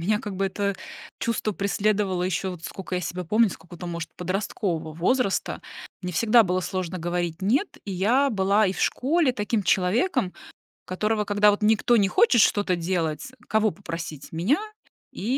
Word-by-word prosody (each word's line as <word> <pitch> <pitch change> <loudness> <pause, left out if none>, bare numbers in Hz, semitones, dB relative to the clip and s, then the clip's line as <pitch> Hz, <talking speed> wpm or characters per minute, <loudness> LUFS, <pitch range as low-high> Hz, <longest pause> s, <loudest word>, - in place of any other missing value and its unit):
меня 210 +5 +1
как 210 -6 -6
бы 195 - +1
это 200 +1 -1 0.5
чувство 230 -2 -1
преследовало 200 -2 0
ещё, 185 +1 -1
вот 165 -2 -11
сколько 190 -1 -6
я 180 - 0
себя 180 +2 -4
помню, 215 +5 +3
с - - -8
какого-то 175 +1 -10
может 170 0 -4
подросткового 180 -3 -3
возраста. 200 +5 0 0.4
Мне 180 -1 -4
всегда 230 +6 +5
было 185 -1 0
сложно 185 0 -3
говорить 175 0 -2
"нет", 270 - +1
и 200 - -5
я 245 +10 +2
была 200 0 +3
и 185 - 0
в - - -6
школе 290 +1 +2
таким 210 -1 -1
человеком, 190 - +1 0.5
которого, 210 +3 -1
когда 205 +1 +4
вот 205 +1 0
никто 220 +2 +4
не 200 -3 +3
хочет 250 - +4
что-то 205 -3 +3
делать, 170 - -2 0.2
кого 220 -1 +2
попросить- 165 -7 -7
меня, 180 - +1 0.5
и - - -8
195 Hz, 170 wpm, -25 LUFS, 180-215 Hz, 0.5 s, всегда